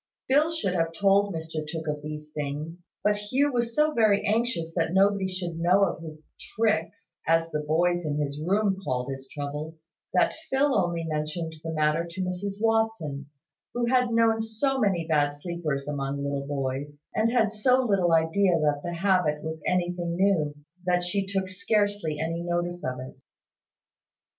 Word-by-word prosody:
Phil 295 +4 +4
should 320 - -1
have 165 -2 0
told 200 +2 +3
Mr 160 -2 -4
Tooke 160 0 -5
of 150 -1 -2
these 150 0 -7
things; 150 +4 -4 0.2
but 210 0 +3
Hugh 260 +8 +1
was 235 -1 -1
so 305 0 +3
very 215 -4 +3
anxious 215 -7 0
that 165 -1 0
nobody 195 0 +4
should 180 -3 -4
know 180 +4 +4
of 180 - 0
his 155 -1 -10 0.3
"tricks" 215 -7 0
(as 165 0 +2
the 150 - -1
boys 175 +4 +1
in 150 -2 -2
his 145 0 -2
room 195 +3 +1
called 125 -2 -2
his 135 0 -7
troubles), 155 +3 -6 0.2
that - - +3 0.2
Phil 275 +1 +3
only 175 -5 +1
mentioned 160 +1 -3
the 165 - -3
matter 155 +1 +2
to 180 +3 -5
Mrs 190 +2 -3
Watson, 220 -11 0 0.5
who 240 0 +1
had 250 0 +3
known 225 -1 +3
so 225 +5 0
many 190 -7 +1
bad 145 -2 +2
sleepers 150 -3 -3
among 140 -1 -2
little 140 -1 -2
boys, 140 +1 -3 0.2
and 225 +1 +2
had 225 -4 +2
so 250 +4 +3
little 195 -7 +2
idea 165 +2 +3
that 150 -2 +1
the 175 - -3
habit 175 -5 +2
was 160 0 -5
anything 175 -1 0
new, 175 -6 +2 0.3
that 180 -1 +2
she 195 +2 -1
took 195 -1 -1
scarcely 205 -3 0
any 165 +2 -2
notice 175 0 -2
of 125 0 -3
it. 130 +1 -8
175 Hz, 170 wpm, -27 LUFS, 155-205 Hz, 0.5 s, Phil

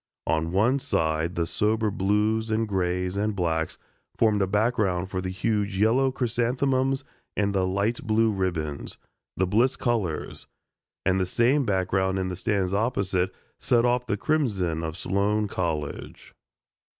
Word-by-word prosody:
On 80 0 0
one 115 +9 +3
side 80 - 0
the 85 - 0
sober 105 +4 0
blues 105 +3 +1
and 110 +1 0
grays 90 -1 -1
and 105 +1 0
blacks 80 -3 -1 0.4
formed 105 -3 +3
a 95 - +2
background 100 -3 0
for 95 - -2
huge 95 +2 -1
yellow 120 +6 +3
chrysanthemums 130 +2 0 0.3
and 100 -1 +1
light 100 +5 0
blue 110 0 +2
ribbons, 85 -7 -3 0.4
the 95 - +2
Bliss 115 +8 +2
colors, 110 - -2 0.6
and 95 0 +2
the 95 - 0
same 125 +8 +2
background 95 0 +1
in 95 -1 -1
the 90 - -4
stands 95 0 -1
opposite 100 -4 0 0.3
set 120 -1 +3
off 125 0 +1
the 105 - 0
crimson 100 - 0
of 80 0 -4
Sloan 105 +3 0
College. 80 -6 -4
100 Hz, 140 wpm, -26 LUFS, 90-115 Hz, 0.6 s, one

